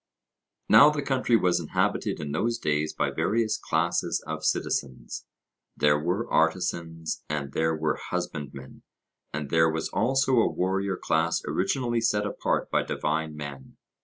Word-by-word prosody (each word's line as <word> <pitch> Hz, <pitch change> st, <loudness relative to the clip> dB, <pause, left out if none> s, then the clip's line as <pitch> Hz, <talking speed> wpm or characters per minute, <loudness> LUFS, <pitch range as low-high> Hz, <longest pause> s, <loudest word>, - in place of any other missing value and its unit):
Now 145 Hz, -, +8 dB
the 150 Hz, -1 st, -2 dB
country 130 Hz, -3 st, +2 dB
was 90 Hz, -4 st, +2 dB
inhabited -, -, -1 dB
in 75 Hz, -2 st, -4 dB
those 115 Hz, +9 st, 0 dB
days 75 Hz, -6 st, 0 dB
by -, -, -1 dB
various 110 Hz, 0 st, +1 dB
classes -, -, 0 dB
of -, -, -5 dB
citizens; 65 Hz, -3 st, -2 dB, 0.5 s
there 75 Hz, 0 st, +3 dB
were 90 Hz, +9 st, -1 dB
artisans, 80 Hz, -1 st, -1 dB
and 75 Hz, -2 st, -3 dB
there 80 Hz, 0 st, +1 dB
were 80 Hz, 0 st, -1 dB
husbandmen, 70 Hz, -2 st, -5 dB, 0.5 s
and 75 Hz, -1 st, -5 dB
there 80 Hz, 0 st, +4 dB
was 80 Hz, 0 st, -2 dB
also 135 Hz, 0 st, +2 dB
a 115 Hz, -, +4 dB
warrior 95 Hz, +1 st, -1 dB
class 80 Hz, 0 st, 0 dB
originally 120 Hz, +4 st, 0 dB
set 105 Hz, -2 st, +1 dB
apart 105 Hz, -, -1 dB
by -, -, +3 dB
divine 80 Hz, 0 st, -2 dB
men. 70 Hz, -3 st, -8 dB
80 Hz, 140 wpm, -27 LUFS, 75-110 Hz, 0.5 s, Now